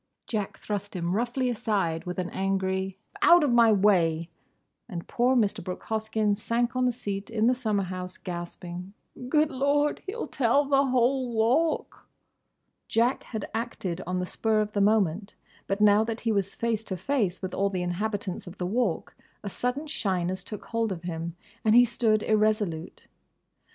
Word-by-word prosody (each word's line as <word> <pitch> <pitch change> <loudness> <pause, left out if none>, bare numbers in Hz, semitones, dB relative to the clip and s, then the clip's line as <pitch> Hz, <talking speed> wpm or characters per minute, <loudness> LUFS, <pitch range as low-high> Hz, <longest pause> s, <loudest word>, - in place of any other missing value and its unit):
Jack 210 -4 -3
thrust 205 -1 -4
him 175 +1 -1
roughly 245 +3 0
aside 205 -8 -1
with 180 0 -4
an 180 -1 -2
angry, 190 0 -1 0.2
"Out 345 -1 +7
of 285 - +2
my 235 -2 +6
way!" 170 -5 +3 0.6
and 170 -5 -6
poor 250 +2 +2
Mr. 210 -4 +1
Brooke 180 +1 -6
Hoskyn 220 -1 0
sank 235 +4 -1
on 255 0 +2
the 250 - +3
seat 205 -4 -4
in 225 -1 +1
the 250 - +5
summer 215 -5 0
house, 185 0 -5
gasping, 175 +2 -7 0.3
"Good 305 +2 +3
Lord! 285 +2 +1
He'll 455 +5 -3
tell 275 +3 +2
the 275 0 +3
whole 255 0 +2
Walk!" 245 +9 +1 0.8
Jack 235 +3 +2
had 220 -4 -5
acted 195 -6 -3
on 180 0 -1
the 180 - -1
spur 220 +3 +1
of 210 0 0
the 205 - 0
moment; 200 -2 +2 0.3
but 195 +1 -1
now 210 +1 +6
that 225 0 -4
he 230 - 0
was 200 -2 -1
face 230 -2 -1
to 190 - -4
face 200 - -1
with 185 - -4
all 200 +1 +1
the 185 -2 -2
inhabitants 195 +1 -3
of 180 +2 -9
the 180 - -2
Walk 235 +7 -1 0.3
a 200 - -4
sudden 250 +8 -2
shyness 185 - -1
took 210 +2 -8
hold 230 -2 -1
of 175 -2 -5
him 170 -1 -4 0.3
and 220 0 +4
he 245 0 +8
stood 220 -3 +1
irresolute. 210 -6 0
210 Hz, 170 wpm, -27 LUFS, 185-240 Hz, 0.8 s, he